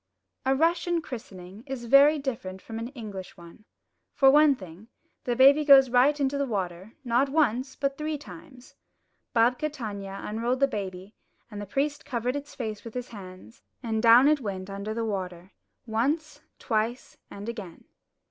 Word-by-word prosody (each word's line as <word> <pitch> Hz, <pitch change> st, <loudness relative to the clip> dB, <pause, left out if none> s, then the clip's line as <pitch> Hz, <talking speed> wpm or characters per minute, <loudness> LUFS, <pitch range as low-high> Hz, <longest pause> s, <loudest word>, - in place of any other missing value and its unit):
A 265 Hz, -, +3 dB
Russian 335 Hz, +3 st, +1 dB
christening 200 Hz, -, -9 dB
is 260 Hz, -3 st, -5 dB
very 280 Hz, +5 st, +6 dB
different 230 Hz, -9 st, -5 dB
from 225 Hz, +3 st, -7 dB
an 230 Hz, -, -4 dB
English 215 Hz, -8 st, -9 dB
one. 170 Hz, +4 st, -15 dB, 0.5 s
For 270 Hz, -1 st, +6 dB
one 295 Hz, 0 st, +6 dB
thing, 185 Hz, -1 st, -12 dB, 0.4 s
the 245 Hz, -, 0 dB
baby 275 Hz, +4 st, +6 dB
goes 270 Hz, -3 st, +7 dB
right 270 Hz, +4 st, +4 dB
into 280 Hz, 0 st, 0 dB
the 280 Hz, -, 0 dB
water, 190 Hz, -1 st, -4 dB
not 250 Hz, +3 st, +1 dB
once, 265 Hz, -3 st, +1 dB
but 275 Hz, 0 st, -2 dB
three 305 Hz, 0 st, -2 dB
times. 260 Hz, -3 st, -13 dB, 0.6 s
Babka 250 Hz, +6 st, +2 dB
Tanya 200 Hz, -7 st, -6 dB
unrolled 235 Hz, +4 st, -2 dB
the 275 Hz, -, +5 dB
baby, 195 Hz, -3 st, -6 dB, 0.4 s
and 205 Hz, 0 st, -6 dB
the 205 Hz, -, -7 dB
priest 285 Hz, +6 st, -1 dB
covered 245 Hz, +1 st, -2 dB
its 285 Hz, 0 st, -7 dB
face 220 Hz, -4 st, -5 dB
with 230 Hz, 0 st, -10 dB
his 250 Hz, 0 st, -5 dB
hand, 190 Hz, +2 st, -12 dB, 0.2 s
and 220 Hz, -2 st, -1 dB
down 235 Hz, +4 st, +7 dB
it 300 Hz, -1 st, +3 dB
went 195 Hz, -3 st, -5 dB
under 200 Hz, +2 st, -5 dB
the 230 Hz, 0 st, -2 dB
water, 185 Hz, -3 st, -5 dB, 0.3 s
once, 280 Hz, +8 st, -1 dB, 0.2 s
twice, 230 Hz, +1 st, -2 dB
and 200 Hz, +2 st, -9 dB
again. 210 Hz, -8 st, -7 dB
235 Hz, 165 wpm, -27 LUFS, 205-275 Hz, 0.6 s, goes